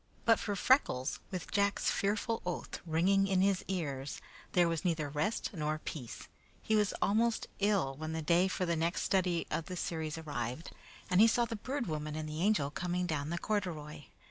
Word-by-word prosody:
But 225 -1 +5
for 205 - -2
Freckles, 185 - +2
with 180 -2 -5
Jack's 200 0 +2
fearful 215 +3 0
oath 180 -1 -4
ringing 190 +5 +3
in 190 -1 +2
his 195 -1 +2
ears, 145 -7 -3 0.3
there 175 -1 +5
was 165 -2 -1
neither 160 -4 0
rest 150 +10 -1
nor 155 -3 -1
peace. 140 -5 -7 0.3
He 220 - 0
was 210 -2 +2
almost 225 +3 +2
ill 195 -10 +2
when 155 +2 -5
the 160 0 -3
day 170 +4 +4
for 185 -1 -1
the 170 -1 +1
next 165 +2 0
study 180 -3 +1
of 165 - -1
the 180 -1 -5
series 160 -2 -3
arrived 145 -2 -4 0.4
and 180 +2 +6
he 225 - +9
saw 235 +1 +3
the 230 - -4
Bird 255 +4 -3
Woman 155 -2 -3
and 155 0 -3
the 155 +1 -4
Angel 190 -8 +2
coming 180 +2 -1
down 155 -3 -2
the 170 - -2
corduroy. 165 -8 -3
175 Hz, 190 wpm, -33 LUFS, 155-200 Hz, 0.4 s, he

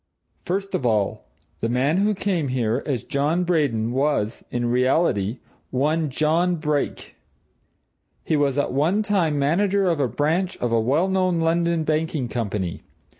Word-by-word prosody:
First 195 +2 -2
of - - -1
all 105 - 0 0.3
the 115 - -1
man 135 +7 +1
who 205 +2 +2
came 185 -6 -1
here 125 -1 0
as 130 -7 -1
John 150 +6 0
Braden 140 -10 +1
was, 130 -4 0
in 120 -1 -2
reality, 125 - +1 0.3
one 150 +4 0
John 160 +6 +1
Brake. 150 -3 -2 1.1
He 160 - 0
was 145 -2 +1
at 145 - 0
one 165 +10 +2
time 180 -8 +1
manager 190 +7 +2
of 165 -4 +1
a 135 - +2
branch 160 - -1
of 120 - -2
a 115 - +3
well 145 +11 +2
known 185 -2 +1
London 170 0 +1
banking 155 -4 -1
company. 105 -7 -3
150 Hz, 150 wpm, -23 LUFS, 125-170 Hz, 1.1 s, a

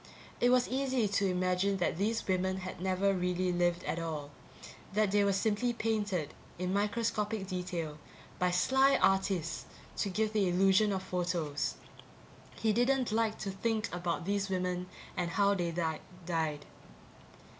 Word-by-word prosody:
It 245 - +4
was 250 0 +4
easy 260 -3 +1
to 200 0 +1
imagine 185 +2 +1
that 175 -2 -1
these 220 +3 0
women 190 0 +1
had 185 -1 -7
never 190 +1 +2
really 180 0 0
lived 175 0 +1
at 165 - -2
all 155 -3 -4 0.6
that 210 -1 +2
they 205 0 +4
were 200 - +3
simply 215 +5 +1
painted, 205 -9 -1 0.2
in 180 +1 -2
microscopic 210 0 0
detail, 180 -5 -4 0.4
by 180 - +3
sly 265 +10 +4
artists 190 -3 +1 0.3
to 200 - 0
give 215 +3 0
the 200 -4 +2
illusion 195 +3 +4
of 190 -1 -2
photos. 175 -5 -1 0.8
He 220 -1 +1
didn't 250 +1 +2
like 220 0 +1
to 195 - -2
think 215 +2 -1
about 175 -1 -2
these 200 0 0
women 180 -1 -1 0.3
and 175 -1 -1
how 200 +2 +3
they 175 -3 -1 0.6
died. 160 -4 -1
190 Hz, 145 wpm, -32 LUFS, 180-215 Hz, 0.8 s, It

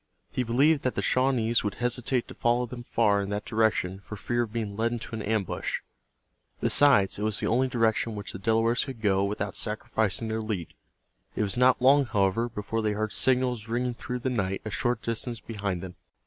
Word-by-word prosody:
He - - -1
believed 135 +6 +3
that 130 - -1
the - - -1
Shawnees 125 -3 +2
would 105 -2 -2
hesitate 125 0 -1
to - - -9
follow 120 +1 +1
them 120 0 -8
far 105 -4 +2
in 100 - -4
that 105 +1 -3
direction 110 -4 +1
for 105 - -8
fear 120 +3 -1
of 115 -3 -3
being 110 -3 -3
led 115 +2 0
into 120 0 -6
an 110 - -3
ambush. 105 -2 -2 0.8
Besides, 105 -10 +4
it - - -4
was 110 -1 0
the - - -2
only 130 +3 +2
direction 115 -2 +1
in - - -7
which 100 - -6
the - - -6
Delawares 115 +2 +2
could 130 -4 -7
go 100 -2 +2
without 100 -1 -2
sacrificing 110 0 -1
their 110 0 -2
lead. 105 -6 -4 0.6
It - - 0
was 100 -2 +1
not 125 0 +4
long, 140 +2 +6
however, 105 +3 +1
before 115 0 -3
they 105 -1 0
heard 110 0 -2
signals 125 -4 +1
ringing 120 +2 -1
through 125 +1 -5
the 130 - -1
night 95 -5 -1
a 110 - -4
short 120 +2 -1
distance 115 0 -3
behind 100 -4 -4
them. 90 -1 -7
115 Hz, 205 wpm, -27 LUFS, 105-120 Hz, 0.8 s, long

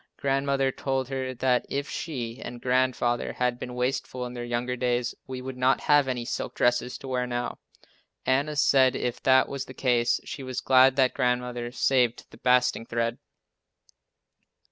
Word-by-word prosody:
Grandmother 135 0 +1
told 135 -1 -2
her 130 -1 -3
that 125 0 +2
if 140 +1 -2
she 125 -7 -5
and 120 0 -7
Grandfather 125 -1 +1
had 125 -1 -1
been 125 -1 -6
wasteful 125 0 -2
in 125 - -7
their 120 -1 -5
younger 120 +1 -2
days, 125 -1 0
we 130 -1 -6
would 130 0 -6
not 130 +1 +2
have 145 -2 +4
any 125 -2 -2
silk 125 - -4
dresses 125 0 +1
to 135 - -10
wear 125 -1 -1
now. 120 0 -3 0.7
Anna 140 +4 +1
said 135 -2 +4
if 125 -1 -3
that 130 0 +4
was 140 -1 -4
the 130 - -11
case 120 -2 +2
she - - -6
was 130 -1 -4
glad 130 0 +5
that 130 -2 +3
Grandmother 125 -2 -1
saved 125 -2 +1
the - - -14
basting 125 -2 +2
thread! 115 0 -1
125 Hz, 165 wpm, -26 LUFS, 125-130 Hz, 0.7 s, glad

